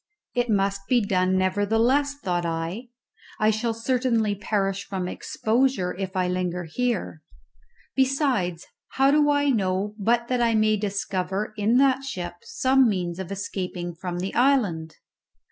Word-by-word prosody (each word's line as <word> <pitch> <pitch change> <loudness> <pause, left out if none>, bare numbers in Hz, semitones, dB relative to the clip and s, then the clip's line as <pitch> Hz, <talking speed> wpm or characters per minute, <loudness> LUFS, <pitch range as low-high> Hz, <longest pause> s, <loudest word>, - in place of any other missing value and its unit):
It 245 -1 0
must 195 -1 0
be 250 - +5
done 185 -1 +2
nevertheless, 225 +9 +2
thought 180 -10 -2
I; 165 +8 -3 0.5
I 215 0 +4
shall 225 +1 -1
certainly 230 -2 +1
perish 200 -1 -1
from 190 -2 -4
exposure 220 -1 0
if 190 0 -5
I 185 -1 +1
linger 180 -1 -2
here; 190 -2 -2 0.7
besides, 260 - +1 0.3
how 270 +1 +4
do 295 0 +4
I 285 -1 +3
know 195 -2 0
but 235 +3 +1
that 250 -1 0
I 230 -1 +3
may 215 0 +3
discover 200 0 -2
in 215 +3 +2
that 270 0 +3
ship 185 -10 -5
some 270 - +3
means 180 -3 -2
of 190 0 -6
escaping 180 -3 -4
from 175 +1 -5
the 185 +2 -3
island? 205 - +1
205 Hz, 145 wpm, -25 LUFS, 185-250 Hz, 0.7 s, be